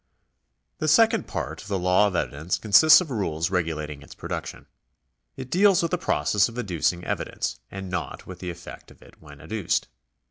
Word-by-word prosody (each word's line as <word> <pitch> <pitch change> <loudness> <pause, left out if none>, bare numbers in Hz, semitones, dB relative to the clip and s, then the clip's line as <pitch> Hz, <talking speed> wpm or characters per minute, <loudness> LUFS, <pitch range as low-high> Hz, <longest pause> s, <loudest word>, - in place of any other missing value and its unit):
The 155 - -1
second 225 +8 +4
part - - -5
of - - -12
the 100 -1 -1
law 90 +3 +3
of 95 - -4
evidence 80 +2 -2
consists 110 - +7
of 165 -6 -6
rules 85 -8 -2
regulating 75 -5 -2
its 70 - -13
production. - - -6 0.7
It 130 -1 -8
deals 195 -1 +4
with 165 - -1
the 180 - +1
process 105 - +1
of 115 - -11
adducing 90 -5 -1
evidence, - - -3
and 95 0 -7
not 90 -2 -5
with 95 -2 -10
the 90 - -5
effect 85 0 -10
of - - -18
it - - -20
when 75 -2 -14
adduced. 110 0 -2
95 Hz, 180 wpm, -25 LUFS, 85-120 Hz, 0.7 s, consists